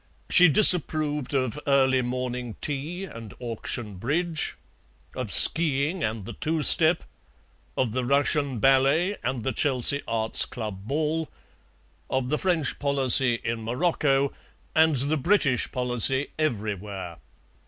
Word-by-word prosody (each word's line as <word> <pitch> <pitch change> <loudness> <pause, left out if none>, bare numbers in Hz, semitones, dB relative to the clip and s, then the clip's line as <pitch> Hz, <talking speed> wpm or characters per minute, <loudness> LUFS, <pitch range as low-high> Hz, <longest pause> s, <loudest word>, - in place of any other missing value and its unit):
She 180 -1 +7
disapproved 155 -5 +2
of 130 +1 -2
early 130 -2 +2
morning 125 -1 -5
tea 150 +6 -5
and 115 - -10
auction 115 -3 -5
bridge, 155 - -2 0.6
of 125 -5 -5
ski 150 -3 +6
ing 180 -4 -7
and 110 -1 -3
the - - -9
two 155 0 -3
step, 160 +3 +4 0.7
of 130 -4 -1
the 130 +2 -3
Russian 140 0 0
ballet 135 - +2
and 125 -1 -3
the 130 - -2
Chelsea 140 +2 +3
Arts 110 -1 0
Club 105 -5 -8
ball, 155 +3 -2 0.8
of 130 -1 -2
the 150 - -1
French 170 -6 -1
policy 135 -3 +3
in 115 -1 -4
Morocco 140 +2 0 0.4
and 160 -1 +3
the 140 +4 -1
British 145 - 0
policy 125 +2 +1
everywhere. 105 - -4
135 Hz, 125 wpm, -24 LUFS, 120-155 Hz, 0.8 s, She